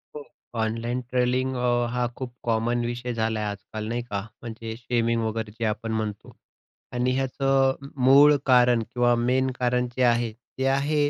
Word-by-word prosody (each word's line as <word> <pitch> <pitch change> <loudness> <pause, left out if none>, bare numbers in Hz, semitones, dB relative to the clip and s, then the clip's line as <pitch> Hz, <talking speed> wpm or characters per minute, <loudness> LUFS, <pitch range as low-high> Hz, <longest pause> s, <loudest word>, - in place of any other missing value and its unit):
हो. 150 - -6 0.4
Online 115 +3 -2
trawling 125 +1 0
अ, 120 -1 +1
हा 125 0 0
खूप 130 -2 -6
कॉमन 120 +1 0
विषय 120 +1 -3
झाला 110 -1 -1
आहे 105 - -1
आजकाल 105 +2 -6
नाही 120 +1 -1
का 100 -1 -2 0.2
म्हणजे 115 -1 -6
शेमिंग 115 -1 0
वगैरे 110 -1 -3
जे 115 - 0
आपण 110 +1 -2
म्हणतो 110 -2 -4 0.6
आणि 125 +1 +1
ह्याचं 135 0 +2
अ, 135 +1 -10 0.2
मूळ 145 +3 +8
कारण 125 -3 +5
किंवा 120 0 +3 0.2
मेन 130 +1 +2
कारण 125 0 +1
जे 130 - +2
आहे, 120 -1 +2
ते 130 +3 -7
आहे, 145 +2 +2
120 Hz, 170 wpm, -25 LUFS, 115-130 Hz, 0.6 s, मूळ